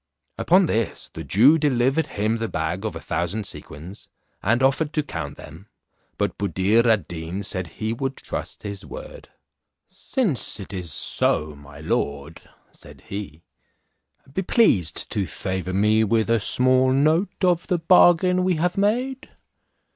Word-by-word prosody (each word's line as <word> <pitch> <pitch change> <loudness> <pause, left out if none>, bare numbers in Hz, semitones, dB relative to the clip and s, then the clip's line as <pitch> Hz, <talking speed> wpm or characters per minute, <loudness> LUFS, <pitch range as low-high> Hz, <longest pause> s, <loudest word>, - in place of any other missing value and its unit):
Upon 185 +2 +4
this 115 -8 -2
the - - -7
Jew 135 - +5
delivered 140 +1 +1
him 110 +3 -1
the 115 - -2
bag 90 +3 -3
of 110 - -3
a - - -5
thousand 85 +6 -3
sequins, 85 +2 -10 0.3
and 120 +5 +1
offered 145 +3 +1
to 150 - 0
count 75 - -6
them, 80 +7 -13 0.5
but 100 -3 -2
Buddir 100 +4 +2
ad 105 -7 +2
Deen 85 +3 -6
said 95 -2 -1
he 110 +7 -4
would 135 +3 -4
trust - - -7
his 100 -1 -6
word. - - -10 0.6
"Since 200 - -1
it 100 +1 -6
is 90 -4 -4
so, 75 +1 +1
my 70 0 -14
lord," 75 0 -3 0.3
said - - -14
he, 95 -6 -7 0.9
"be 190 - -1
pleased 145 - +2
to 100 -3 -1
favour 95 -1 -4
me 105 +3 +3
with 110 +1 +1
a 115 - +3
small 130 +4 +4
note 155 +10 +1
of 175 -2 +2
the 180 - +1
bargain 180 +1 +4
we 185 -1 +1
have 175 +4 -1
made." 250 +6 -1
110 Hz, 150 wpm, -23 LUFS, -, 0.9 s, Jew